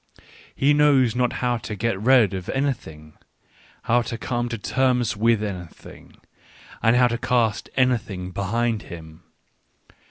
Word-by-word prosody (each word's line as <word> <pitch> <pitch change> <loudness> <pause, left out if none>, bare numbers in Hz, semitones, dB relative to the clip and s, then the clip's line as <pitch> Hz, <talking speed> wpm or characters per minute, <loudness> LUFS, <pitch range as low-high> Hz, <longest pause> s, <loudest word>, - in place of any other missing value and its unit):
He 140 +2 +3
knows 140 -5 +3
not 125 -1 +1
how 120 -1 +1
to 105 -1 -6
get 105 -1 -2
rid 120 -4 +4
of 95 -1 -6
any 140 +1 +1
thing, 75 -8 -14 0.7
how 120 +1 +2
to 115 -1 -5
come 120 +1 -3
to 120 - -4
terms 125 0 0
with 110 0 +2
anything, 90 -5 -9 0.6
and 115 +1 +3
how 125 0 +5
to 120 -1 -3
cast 115 -4 0
anything 110 -8 0
behind 110 +4 -1
him. 80 -4 -11
115 Hz, 140 wpm, -23 LUFS, 100-125 Hz, 0.7 s, how